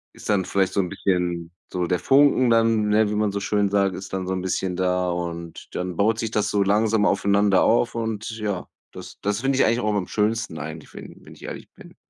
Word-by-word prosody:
ist -, -, -10 dB
dann 100 Hz, -3 st, +2 dB
vielleicht 95 Hz, -2 st, +1 dB
so -, -, 0 dB
'n 90 Hz, -, -3 dB
bisschen 85 Hz, -3 st, -1 dB, 0.2 s
so 90 Hz, -1 st, -1 dB
der 90 Hz, -1 st, 0 dB
Funken 135 Hz, -2 st, +4 dB
dann, 115 Hz, -2 st, +3 dB
ne, 105 Hz, 0 st, +3 dB
wie 105 Hz, -, -2 dB
man 105 Hz, -1 st, +1 dB
so 100 Hz, -, -2 dB
schön 100 Hz, 0 st, +1 dB
sagt 100 Hz, -2 st, +1 dB
ist 95 Hz, -, -9 dB
dann 95 Hz, -1 st, -3 dB
so 95 Hz, -, -1 dB
'n 95 Hz, -, -2 dB
bisschen 95 Hz, 0 st, -2 dB
da 90 Hz, -1 st, 0 dB
und 85 Hz, -1 st, -5 dB
dann 90 Hz, -1 st, -3 dB
baut 110 Hz, +2 st, +2 dB
sich 115 Hz, -2 st, -2 dB
das 105 Hz, -1 st, 0 dB
so 100 Hz, -1 st, +2 dB
langsam 105 Hz, +1 st, +2 dB
aufeinander 100 Hz, 0 st, +3 dB
auf 120 Hz, +1 st, +2 dB
und 110 Hz, -2 st, -3 dB
ja, 100 Hz, -4 st, -3 dB, 0.3 s
das -, -, -11 dB
das 105 Hz, +2 st, -1 dB
finde 135 Hz, 0 st, +1 dB
ich -, -, +4 dB
eigentlich 115 Hz, +2 st, +1 dB
auch 105 Hz, -2 st, 0 dB
am 95 Hz, -3 st, -1 dB
schönsten 110 Hz, -5 st, -1 dB
eigentlich, 80 Hz, +1 st, -8 dB
wenn -, -, -11 dB
wenn -, -, -13 dB
ich -, -, -17 dB
ehrlich -, -, -8 dB
bin. -, -, -15 dB
100 Hz, 235 wpm, -23 LUFS, 90-110 Hz, 0.3 s, Funken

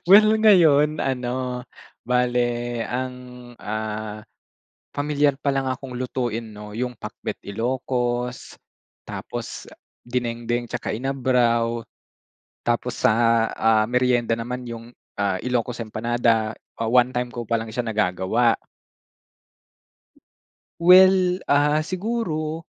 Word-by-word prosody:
Well, 215 Hz, +4 st, +7 dB
ngayon, 160 Hz, -9 st, +5 dB
ano, 125 Hz, -1 st, -2 dB, 0.4 s
bale 125 Hz, 0 st, +2 dB, 0.4 s
ang, 130 Hz, +1 st, -3 dB, 0.4 s
ah, 110 Hz, 0 st, -4 dB, 0.8 s
pamilyar 145 Hz, -1 st, +1 dB
palang 135 Hz, -2 st, +1 dB
akong 130 Hz, 0 st, -5 dB
lutuin 125 Hz, -2 st, -2 dB, 0.2 s
'no, 105 Hz, 0 st, -9 dB
yung 125 Hz, +2 st, -3 dB
Pakbet -, -, -6 dB
Ilocos, 125 Hz, +2 st, -2 dB, 0.5 s
tapos -, -, -7 dB, 0.3 s
dinengdeng 120 Hz, -1 st, -2 dB
tsaka 115 Hz, -, -4 dB
inabraw. 120 Hz, -3 st, +1 dB, 0.8 s
Tapos 120 Hz, 0 st, -1 dB
sa, -, -, +6 dB, 0.4 s
ah, 110 Hz, -1 st, +3 dB
meryenda 125 Hz, 0 st, +1 dB
naman 125 Hz, +2 st, -3 dB
yung, 115 Hz, 0 st, -9 dB, 0.2 s
ah, 100 Hz, -2 st, +1 dB
Ilocos 120 Hz, -1 st, -1 dB
Empanada. 110 Hz, 0 st, 0 dB, 0.2 s
One-time 125 Hz, +2 st, +2 dB
ko 120 Hz, -1 st, -6 dB
pa 115 Hz, +1 st, 0 dB
lang 115 Hz, -, -6 dB
siya 120 Hz, +2 st, -3 dB
nagagawa. 110 Hz, +2 st, +1 dB, 2.3 s
Well, 185 Hz, 0 st, +6 dB
ah, 150 Hz, +2 st, +3 dB
siguro, 170 Hz, -6 st, -3 dB
125 Hz, 95 wpm, -23 LUFS, 115-135 Hz, 2.3 s, Well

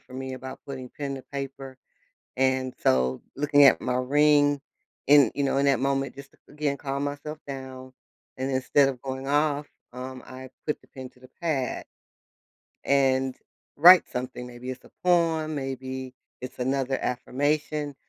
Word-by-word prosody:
for 130 Hz, -, -19 dB
me 130 Hz, 0 st, -5 dB
about 130 Hz, +1 st, -8 dB
putting 130 Hz, -2 st, -7 dB
pen 140 Hz, -2 st, -4 dB
to 130 Hz, -, -9 dB
paper, 135 Hz, -1 st, -6 dB, 0.6 s
and 130 Hz, -1 st, +1 dB
so, 65 Hz, 0 st, +2 dB
looking 145 Hz, 0 st, +4 dB
at 135 Hz, -, +6 dB
my 125 Hz, -, -1 dB
ring 145 Hz, +2 st, +3 dB, 0.5 s
in 145 Hz, -1 st, +7 dB
you 140 Hz, -, 0 dB
know, 135 Hz, -, +1 dB
in 140 Hz, -, +2 dB
that 140 Hz, -2 st, +3 dB
moment 135 Hz, 0 st, -1 dB
just 140 Hz, 0 st, -11 dB
to, -, -, -26 dB
again, 145 Hz, -1 st, -1 dB
calm 140 Hz, 0 st, -3 dB
myself 145 Hz, +2 st, -5 dB
down, 130 Hz, -1 st, -8 dB, 0.4 s
and 130 Hz, +1 st, -2 dB
instead 135 Hz, +1 st, +3 dB
of 130 Hz, -3 st, -6 dB
going 135 Hz, 0 st, -5 dB
off, 145 Hz, 0 st, +1 dB, 0.3 s
um, 130 Hz, 0 st, -7 dB
I 130 Hz, 0 st, -10 dB, 0.2 s
put 150 Hz, -, -1 dB
the -, -, -23 dB
pen 130 Hz, -2 st, -9 dB
to -, -, -25 dB
the 130 Hz, -, -15 dB
pad 145 Hz, -7 st, -1 dB, 1.0 s
and 135 Hz, -1 st, +2 dB, 0.4 s
write 175 Hz, +4 st, +8 dB
something, 125 Hz, -1 st, -5 dB
maybe 125 Hz, +1 st, -8 dB
it's 130 Hz, 0 st, -8 dB
a -, -, -17 dB
poem, 165 Hz, -3 st, +2 dB
maybe 130 Hz, -1 st, -5 dB, 0.3 s
it's 130 Hz, 0 st, -8 dB
another 130 Hz, +1 st, 0 dB
affirmation, 145 Hz, +3 st, -1 dB
135 Hz, 165 wpm, -26 LUFS, 130-145 Hz, 1.0 s, write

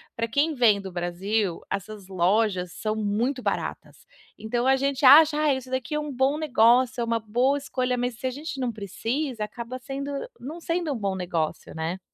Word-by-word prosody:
pra 230 Hz, 0 st, -1 dB
quem 290 Hz, +6 st, +1 dB
vem 215 Hz, -5 st, +4 dB
do 190 Hz, -, -7 dB
Brasil, 180 Hz, +2 st, -1 dB
essas 200 Hz, 0 st, -5 dB
lojas 185 Hz, 0 st, +1 dB
são 215 Hz, 0 st, -2 dB
muito 225 Hz, +5 st, -1 dB
baratas. -, -, -4 dB, 0.3 s
Então, 240 Hz, +3 st, -1 dB
a 265 Hz, 0 st, +5 dB
gente 275 Hz, 0 st, 0 dB
acha 300 Hz, +2 st, +8 dB
"Ah, 305 Hz, -2 st, +3 dB
isso 260 Hz, -1 st, -5 dB
daqui 260 Hz, +2 st, -3 dB
é 300 Hz, -, +1 dB
um 300 Hz, -1 st, -4 dB
bom 265 Hz, +3 st, +1 dB
negócio, 250 Hz, -3 st, +3 dB
é -, -, +1 dB
uma 230 Hz, 0 st, 0 dB
boa 245 Hz, +6 st, +1 dB
escolha", 255 Hz, -2 st, -1 dB
mas 245 Hz, 0 st, -2 dB
se -, -, -6 dB
a 255 Hz, -, +1 dB
gente 290 Hz, +1 st, -6 dB
não 250 Hz, -2 st, -1 dB
precisa, 225 Hz, +4 st, -3 dB
acaba 235 Hz, +3 st, -6 dB
sendo 275 Hz, +2 st, -5 dB, 0.3 s
não 310 Hz, +6 st, -7 dB
sendo 335 Hz, -1 st, -1 dB
um -, -, -4 dB
bom 200 Hz, -3 st, -2 dB
negócio, 170 Hz, -6 st, -3 dB
né. 165 Hz, +3 st, -3 dB
240 Hz, 195 wpm, -25 LUFS, 205-275 Hz, 0.3 s, acha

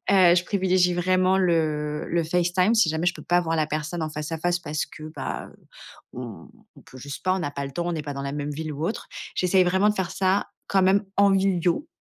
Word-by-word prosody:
heu, 185 Hz, -3 st, +6 dB
je 180 Hz, -, +2 dB
privilégie 185 Hz, -2 st, +2 dB
vraiment 185 Hz, +1 st, +2 dB
le 155 Hz, -5 st, 0 dB
le 170 Hz, 0 st, +1 dB
Facetime, 180 Hz, +5 st, +2 dB
si 225 Hz, -4 st, +4 dB
jamais 160 Hz, +2 st, -1 dB
je 175 Hz, -, +2 dB
peux -, -, -10 dB
pas 175 Hz, +1 st, +3 dB
voir 165 Hz, -1 st, -1 dB
la 155 Hz, -1 st, +1 dB
personne 155 Hz, +2 st, -3 dB
en 155 Hz, -, -3 dB
face 150 Hz, +1 st, -5 dB
à 165 Hz, -, -3 dB
face 175 Hz, +2 st, 0 dB
parce 150 Hz, -2 st, -3 dB
que, -, -, -13 dB
ben, -, -, -5 dB, 0.6 s
heu, 125 Hz, -, -6 dB, 0.6 s
on -, -, -14 dB
peut 130 Hz, -, -13 dB
juste 140 Hz, +2 st, -8 dB
pas, 185 Hz, 0 st, +3 dB
on 190 Hz, -, -2 dB
a 145 Hz, -, -2 dB
pas 140 Hz, 0 st, -4 dB
le 135 Hz, -, -9 dB
temps, 170 Hz, +4 st, -3 dB
on 175 Hz, -, -1 dB
est 155 Hz, -, -3 dB
pas 145 Hz, -1 st, -5 dB
dans 140 Hz, -, -5 dB
la 140 Hz, 0 st, -4 dB
même 145 Hz, 0 st, -3 dB
ville 155 Hz, +1 st, -4 dB
ou 150 Hz, +3 st, -3 dB
autre. 215 Hz, -, -4 dB, 0.3 s
J'essaye 185 Hz, 0 st, +3 dB
vraiment 190 Hz, +3 st, +3 dB
de 210 Hz, -, +2 dB
faire 190 Hz, -3 st, -2 dB
ça 190 Hz, +1 st, +1 dB, 0.2 s
quand 195 Hz, -1 st, +3 dB
même 195 Hz, +2 st, +3 dB
en 200 Hz, 0 st, +5 dB
visio 190 Hz, -, +1 dB
175 Hz, 250 wpm, -25 LUFS, 155-185 Hz, 0.6 s, heu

